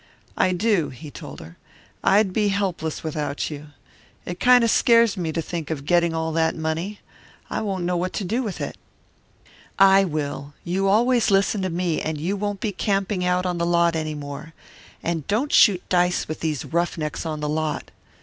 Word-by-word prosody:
"I 185 - +2
do," 190 -3 +1
he 145 +3 -10
told - - -9
her. 80 +2 -13 0.4
"I'd 195 -1 +4
be 210 0 +2
helpless 190 -6 -2
without 150 -2 -3
you. 150 0 -8 0.6
It 175 0 -6
kind 250 -1 +6
of 230 - +3
scares 230 -3 +4
me 170 -4 -2
to 165 +1 -2
think 165 -3 -5
of 145 -3 -4
getting 170 0 +3
all 160 0 -1
that 160 0 +1
money. 165 +6 -3 0.5
I - - -1
won't 195 -4 -2
know 180 +1 0
what 180 +1 -1
to - - -2
do 220 +8 -1
with 210 -7 -4
it." - - -4 1.0
"I 195 0 +7
will; 145 -3 -4
you 190 +3 0
always 235 +4 +3
listen 195 +1 +2
to 185 - -1
me, 170 -1 -1
and 155 -1 -3
you 180 +6 -1
won't 205 0 -3
be 215 - -1
camping 195 -1 -1
on 180 -1 0
the 170 - +1
lot 170 -1 +3
any 155 -1 -2
more. 145 +2 -8 0.5
And 165 -4 -2
don't 240 +8 0
shoot 190 -5 +5
dice 180 -1 +1
with 155 - -5
these 155 -4 -2
rough 170 +2 -1
necks 150 -2 -3
on 155 -2 -4
the 150 - -2
lot." 155 0 -2
175 Hz, 190 wpm, -23 LUFS, 155-195 Hz, 1.0 s, I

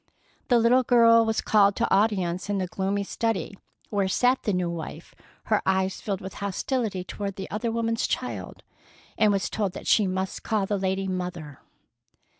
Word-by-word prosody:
The 245 - +4
little 235 +3 +4
girl 230 -2 +5
was 220 0 0
called 200 -2 +4
to - - 0
audience 190 -3 +1
in 205 - 0
the 190 - -1
gloomy 195 +2 -2
study 225 0 -2 0.4
where 200 -2 +1
sat 250 +7 +2
the 210 - -1
new 180 -2 0
wife, 165 -1 -7 0.3
her 215 - +1
eyes 190 0 0
filled 195 -3 -3
with 190 - -7
hostility 200 0 -2
toward 200 +1 -5
the 190 - -6
other 220 +3 -2
woman's 230 0 0
child, - - -4 0.5
and 215 -1 +3
was 195 -1 0
told 200 -4 -2
that - - -8
she 210 -3 +4
must 190 +1 -3
call 215 -3 0
the 200 0 -1
lady 190 0 -1
"Mother." 180 -6 -5
200 Hz, 175 wpm, -26 LUFS, 190-225 Hz, 0.5 s, girl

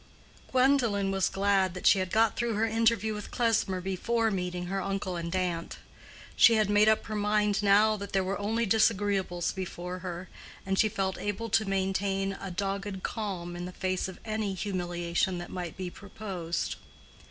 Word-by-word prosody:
Gwendolen 250 -7 +3
was 195 -1 +1
glad 195 -2 +1
that 180 - -7
she 195 - +6
had 185 -1 -2
got 225 0 +3
through 235 -1 -1
her 220 +2 +2
interview 225 -1 +2
with 210 -1 -6
Klesmer 225 -6 +1
before 220 +5 0
meeting 180 -2 -3
her 195 +2 -2
uncle 195 -2 -2
and 170 +1 -3
aunt. 175 -2 -2 0.6
She 230 - +7
had 215 -2 +2
made 210 +1 +5
up 220 - +2
her 215 - -5
mind 210 0 +1
now 210 +2 +5
that 200 0 -7
there 195 -1 +2
were 195 +2 -2
only 225 +3 0
disagreeables 200 -4 +1
before 180 -1 -5
her, 180 0 -6 0.4
and 195 0 0
she 215 - +4
felt 195 -3 -2
able 205 +3 -3
to 215 +1 +3
maintain 195 0 0
a 195 - -5
dogged 195 +1 -3
calm 185 -6 -4
in 175 0 -5
the 180 - -6
face 185 0 -2
of 190 - -9
any 215 -3 -2
humiliation 175 -2 -1
that 175 - -7
might 175 -2 -5
be 185 -2 -4
proposed. 190 -5 -4
195 Hz, 175 wpm, -29 LUFS, 185-215 Hz, 0.6 s, She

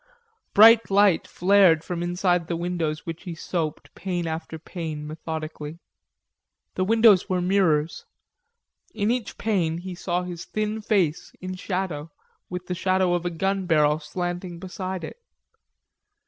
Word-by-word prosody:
Bright 225 +2 +8
light 200 -3 +4
flared 180 -4 +4
from 175 -1 -4
inside 175 -1 0
the 170 - -2
windows 165 -2 -2
which 165 0 -6
he 175 -3 -6
soaped, 160 -1 -4
pane 175 -1 -3
after 160 0 -4
pane, 160 -2 -6
methodically. 155 0 -6 1.0
The 185 - 0
windows 220 -2 +5
were 185 -1 +1
mirrors. 180 - +1 0.9
In 210 +1 +1
each 245 -3 -3
pane 180 -7 0
he 185 +1 -6
saw 175 0 -2
his 175 -2 -7
thin 215 +1 -2
face, 185 -7 0
in 185 0 -5
shadow, 180 -5 -3 0.4
with 180 0 -5
the 180 - -3
shadow 185 0 +1
of 175 0 -1
a - - 0
gun 195 +2 -1
barrel 150 -2 +3
slanting 175 +3 -4
beside 185 0 -5
it. - - -8
180 Hz, 140 wpm, -25 LUFS, 165-190 Hz, 1.0 s, Bright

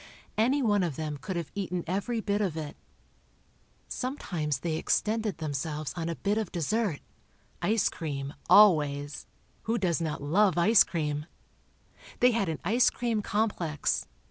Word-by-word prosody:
Any 260 +6 +2
one 205 -3 +3
of 170 -6 -1
them 150 -1 -4
could 185 +6 -5
have 170 -1 -4
eaten 180 -3 -3
every 205 +6 -2
bit 205 0 0
of 180 -6 -1
it. 150 -2 -5 1.1
Sometimes 170 - -3
they 160 -2 -1
extended 215 +3 0
themselves 150 0 -3
on 170 -1 -3
a 165 - -2
bit 205 +5 0
of 215 -5 -4
dessert—ice 205 +3 -2
cream, 145 -5 -5 0.2
always—who 150 +4 +3
does 175 -5 0
not 155 -3 -3
love 185 +5 +3
ice 210 +5 +6
cream? 150 -2 -3 0.9
They 250 - +6
had 220 -6 0
an 160 - -2
ice 235 +7 +4
cream 230 -3 -1
complex. 200 -8 -1
175 Hz, 140 wpm, -29 LUFS, 155-215 Hz, 1.1 s, ice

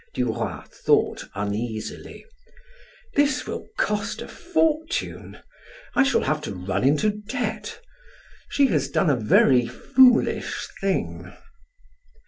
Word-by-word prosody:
Duroy 125 -1 -2
thought - - 0
uneasily: 105 +2 -5 0.9
"This 290 0 +2
will - - -6
cost 210 0 -1
a - - -10
fortune. 320 -3 -1 0.6
I - - +4
shall 275 0 +3
have 155 0 0
to 105 -9 -5
run 95 +3 -2
into 150 +11 +3 0.2
debt. 250 - -3 0.7
She 285 - +3
has 145 - 0
done 150 +3 +2
a - - +3
very 120 +2 +4
foolish 250 - +3
thing." 195 -1 -2
150 Hz, 110 wpm, -24 LUFS, -, 0.9 s, I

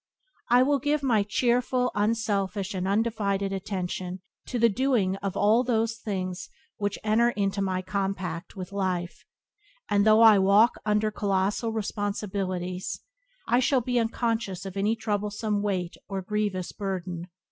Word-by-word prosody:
I 245 +1 +6
will 285 +1 +2
give 290 +2 0
my 235 -6 +3
cheerful, 250 +4 +1
unselfish, 205 -2 0
and 185 -1 -2
undivided 200 -2 0
attention 185 -1 -4 0.3
to 250 - -2
the 235 0 +5
doing 230 -4 +1
of 195 -1 -4
all 220 +4 +4
those 230 -2 +1
things 185 -4 -4 0.3
which 205 -1 -2
enter 220 +2 +3
into 200 -3 -1
my 185 -1 -1
compact 185 -3 -3
with 185 0 -7
life, 185 -3 -2 0.7
and, 200 0 +4
though 215 +1 +6
I 220 -3 +8
walk 200 +5 +5
under 210 0 +2
colossal 205 +2 0
responsibilities, 195 -4 -3 0.5
I 240 - +3
shall 260 0 +2
be 245 +1 0
unconscious 225 -4 -1
of 190 -1 -7
any 205 +3 +1
troublesome 210 -1 -2
weight 185 -4 -2
or 195 -1 -3
grievous 205 -2 -2
burden. 180 -3 -4
205 Hz, 140 wpm, -27 LUFS, 190-225 Hz, 0.7 s, I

